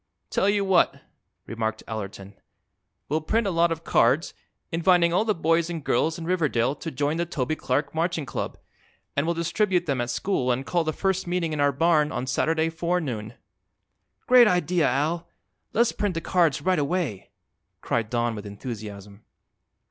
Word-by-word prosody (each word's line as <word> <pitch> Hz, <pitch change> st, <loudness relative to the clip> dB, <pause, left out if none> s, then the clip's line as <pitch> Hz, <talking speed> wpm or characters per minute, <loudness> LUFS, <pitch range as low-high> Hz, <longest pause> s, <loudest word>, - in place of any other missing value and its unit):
"Tell 195 Hz, -, +2 dB
you 205 Hz, -1 st, +1 dB
what," 190 Hz, -1 st, +3 dB, 0.5 s
remarked 110 Hz, -1 st, -3 dB
Allerton; 100 Hz, -2 st, -6 dB, 0.7 s
"we'll 155 Hz, +2 st, 0 dB
print 225 Hz, +8 st, 0 dB
a 195 Hz, -, 0 dB
lot 170 Hz, 0 st, +2 dB
of 165 Hz, 0 st, -3 dB
cards, 135 Hz, +8 st, +2 dB, 0.4 s
inviting 170 Hz, 0 st, +3 dB
all 200 Hz, +5 st, +2 dB
the 215 Hz, -2 st, +1 dB
boys 165 Hz, +1 st, +1 dB
and 165 Hz, -4 st, -5 dB
girls 160 Hz, +4 st, +1 dB
in 165 Hz, -, -6 dB
Riverdale 150 Hz, -8 st, +1 dB
to 155 Hz, +3 st, -6 dB
join 145 Hz, +2 st, -1 dB
the 170 Hz, -, 0 dB
Toby 155 Hz, -2 st, -2 dB
Clark 140 Hz, 0 st, -1 dB
Marching 165 Hz, -1 st, -1 dB
Club, -, -, -4 dB, 0.6 s
and 140 Hz, +3 st, 0 dB
we'll 170 Hz, -, +1 dB
distribute 175 Hz, +2 st, +1 dB
them 140 Hz, -6 st, 0 dB
at 120 Hz, -, -3 dB
school 130 Hz, -2 st, 0 dB
and 130 Hz, +2 st, -1 dB
call 170 Hz, +2 st, +1 dB
the 155 Hz, -, -1 dB
first 190 Hz, +2 st, -1 dB
meeting 175 Hz, -2 st, -1 dB
in 150 Hz, -, -3 dB
our 145 Hz, 0 st, +4 dB
barn 155 Hz, +1 st, +2 dB
on 120 Hz, +1 st, -3 dB
Saturday 160 Hz, +5 st, +1 dB
forenoon." 155 Hz, -11 st, -2 dB, 0.9 s
"Great 250 Hz, -2 st, +7 dB
idea, 180 Hz, -3 st, +2 dB
Al! 160 Hz, +5 st, -1 dB, 0.4 s
Let's 235 Hz, +1 st, +3 dB
print 205 Hz, -4 st, -2 dB
the -, -, 0 dB
cards 165 Hz, -4 st, +1 dB
right 185 Hz, -3 st, +2 dB
away," 145 Hz, -, -2 dB, 0.5 s
cried 115 Hz, -2 st, -1 dB
Don 120 Hz, -1 st, 0 dB
with 105 Hz, -1 st, -7 dB
enthusiasm. 100 Hz, -1 st, -8 dB
160 Hz, 170 wpm, -25 LUFS, 130-175 Hz, 0.9 s, Great